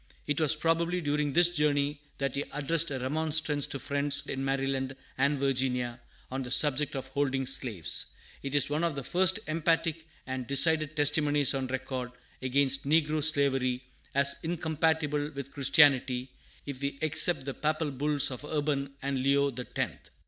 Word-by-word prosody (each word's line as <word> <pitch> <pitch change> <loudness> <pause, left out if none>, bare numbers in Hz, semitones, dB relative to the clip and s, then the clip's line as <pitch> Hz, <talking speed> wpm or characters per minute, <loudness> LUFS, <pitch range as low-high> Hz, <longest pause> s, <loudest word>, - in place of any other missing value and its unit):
It 150 +2 -1
was 155 0 +4
probably 165 +3 0
during 150 -2 -1
this 175 +2 +4
journey 145 -2 0 0.2
that 135 -2 -2
he 140 - -1
addressed 165 +3 +2
a 135 - -3
remonstrance 150 +2 +1
to - - -6
friends 140 +1 +1
in 135 0 -4
Maryland 135 -1 -2 0.2
and 140 +2 +1
Virginia 125 -3 -1 0.3
on 135 +1 -3
the 125 - -6
subject 145 +2 +3
of 135 0 -5
holding 135 -1 -1
slaves. 120 -10 -3 0.3
It 140 +1 -4
is 145 - +3
one 150 +3 -2
of 170 -4 -1
the 140 - -5
first 190 +6 +3
emphatic 165 0 -1 0.2
and 130 -2 -5
decided 155 +2 +4
testimonies 145 -1 +2
on 135 -1 -2
record 130 -1 -5 0.3
against 135 +1 +1
negro 155 0 +2
slavery 135 -4 0 0.3
as 140 0 +4
incompatible 160 -2 -1
with 140 0 -7
Christianity, 135 -3 +3 0.3
if 140 -2 -7
we 140 0 -3
except 155 -1 +4
the 135 - -4
Papal 155 +1 -2
bulls 145 +1 +2
of 130 - -7
Urban 145 -2 -2
and 135 -1 -2
Leo 140 +1 +2
the 125 0 -7
Tenth. - - -5
140 Hz, 160 wpm, -29 LUFS, 135-155 Hz, 0.3 s, was